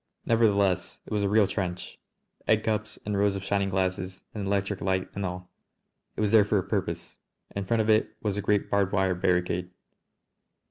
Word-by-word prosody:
Nevertheless 100 -5 +2
it - - -6
was 105 - +1
a 100 - +1
real 105 0 +5
trench, 90 -2 -4 0.5
egg 110 0 +3
cups 110 0 -2
and 105 0 -1
rows 100 0 +2
of 100 - -4
shining 100 0 0
glasses 95 0 -2
and 100 -3 -4
electric 100 0 -1
light 95 0 0
and 100 - -4
all. 90 -1 -5 0.6
It - - -3
was 105 -1 +2
there 110 -2 +7
for 105 0 +1
a 95 - +1
purpose. - - -3 0.4
In 100 -1 -2
front 115 +3 +2
of 110 - -1
it 110 - +2
was 105 -3 -1
a 105 - -1
great 100 0 +1
barbed 100 -1 +2
wire 95 -2 +2
barricade. 90 0 0
100 Hz, 190 wpm, -27 LUFS, 95-105 Hz, 0.6 s, there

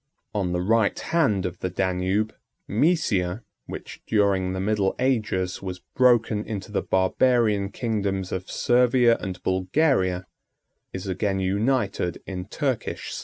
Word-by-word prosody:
On 95 -4 -1
the 90 0 0
right 110 +1 +2
hand 130 - +1
of 90 -1 -4
the 95 - -2
Danube, 95 +4 0 0.3
Mæsia, 110 - +1 0.2
which, - - -8
during 100 -3 +2
the 95 - -3
middle 100 0 +1
ages, 110 -8 0
was 95 -2 -5 0.2
broken 120 -4 +3
into 105 -1 -6
the 105 - 0
barbarian 105 +1 +2
kingdoms 100 -4 -2
of 95 0 -4
Servia 120 -1 +4
and 95 -2 -6
Bulgaria, 95 - +1 0.7
is 95 0 -6
again 95 +1 -1
united 100 -2 0
in 90 -2 -5
Turkish 130 +3 -3
slavery. - - -4
100 Hz, 130 wpm, -25 LUFS, 95-115 Hz, 0.7 s, Servia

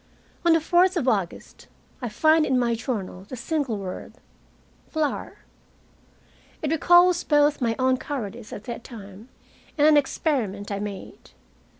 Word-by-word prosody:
On 340 -1 +5
the 330 - +4
fourth 355 +3 +3
of 275 -6 -1
August 195 -8 -2 0.3
I 245 - -3
find 315 +7 +4
in 265 -3 +1
my 240 -1 +1
journal 210 -6 -4
the 255 - -8
single 255 -2 -2
word 190 -2 -7 0.8
"flour." 310 -3 -2 1.3
It 300 - 0
recalls 350 +2 +5
both 295 -1 +3
my 230 -2 +1
own 260 0 +2
cowardice 240 -6 -6
at 205 - -7
that 235 0 -6
time, 210 0 -11 0.5
and 295 - +4
an 305 -1 +6
experiment 235 - -1
I 200 - -2
made. 200 -1 -8
255 Hz, 140 wpm, -24 LUFS, 210-310 Hz, 1.3 s, an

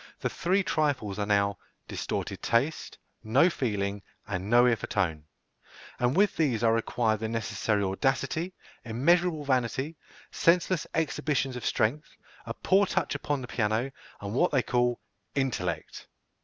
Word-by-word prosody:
The - - -1
three 190 +3 +1
trifles 130 - 0
are 100 - -1
now 100 -1 +2 0.3
distorted - - -4
taste, 130 +7 0 0.3
no 135 +11 +4
feeling, 100 -7 -2 0.2
and 95 0 -4
no 120 +1 +6
ear 120 -2 +4
for - - -7
tone; 80 -7 -1 0.7
and 125 +3 +2
with 205 +1 +4
these 125 -8 +1
are 115 -1 +4
required 115 -1 +1
the 110 0 -3
necessary 105 -2 -1
audacity, 135 - -1 0.3
immeasurable 155 +7 +2
vanity, 130 +4 0 0.3
senseless 175 0 +2
exhibitions 150 -4 0
of 125 - -3
strength, 145 +8 0 0.3
a - - -3
poor 195 +1 +3
touch - - 0
upon 145 -1 -2
the 125 - -6
piano, 115 +3 0 0.3
and 100 +1 -5
what 175 +9 +3
they 135 -4 +2
call 120 -1 +1 0.4
"intellect." 115 - -2
125 Hz, 140 wpm, -28 LUFS, 105-150 Hz, 0.7 s, no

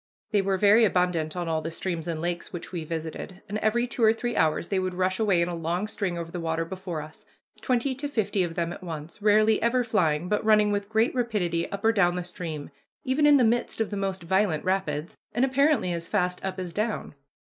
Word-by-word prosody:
They 205 -2 +3
were 195 0 0
very 210 +4 +6
abundant 180 -5 +1
on 175 -1 -2
all 160 -1 0
the 160 - -4
streams 165 0 -4
and 165 -2 -2
lakes 175 +1 -3
which 175 -1 -7
we 175 -3 -4
visited, 165 +4 -6
and 210 +2 -3
every 235 +3 +1
two 240 -1 -3
or 220 0 +6
three 240 +1 -3
hours 160 +1 +1
they 195 - +1
would 185 -1 -2
rush 185 +2 0
away 195 -6 +3
in - - -1
a 175 - -3
long 170 +4 -2
string 200 -5 -2
over 165 -1 -5
the 175 - -4
water 165 0 -1
before 175 -3 -5
us, 155 +1 -13 0.4
twenty 255 +1 +1
to 275 +3 -4
fifty 215 -7 0
of 170 -2 -2
them 170 0 -1
at - - -10
once, 165 +1 -7
rarely 215 +1 +4
ever 245 +2 +2
flying, 175 -8 +1
but 210 +2 0
running 215 -1 +4
with 205 0 -2
great 220 +2 +2
rapidity 205 -9 -1
up 200 +1 -4
or 225 - +6
down 180 -5 +3
the 180 - -2
stream, 160 -4 -6 0.3
even 285 +3 +2
in 290 -1 +7
the 255 - +4
midst 235 +1 +1
of 220 - -1
the - - -2
most 195 -2 -2
violent 190 -3 +1
rapids, 185 -1 -1 0.2
and 240 +4 +3
apparently 270 - +2
as 170 -1 -4
fast 180 -3 0
up 190 0 -3
as 180 -2 -5
down. 215 +2 -2
185 Hz, 230 wpm, -26 LUFS, 170-220 Hz, 0.4 s, in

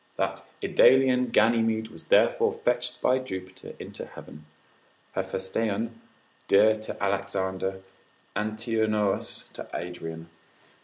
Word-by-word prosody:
That - - -2 0.2
Idalian 130 -1 +5
Ganymede 115 -1 +3
was 80 - -13
therefore - - +4
fetched 125 0 -1
by 130 +1 +4
Jupiter 95 -7 -8
into - - -8
heaven, 75 +1 -12 0.6
Hephaestion 110 +4 -2 0.5
dear 110 +2 +6
to 110 -2 -6
Alexander, 95 -1 -1 0.5
Antinous 110 -1 -1
to - - -8
Adrian. 85 -1 -6
110 Hz, 95 wpm, -27 LUFS, 95-115 Hz, 0.6 s, dear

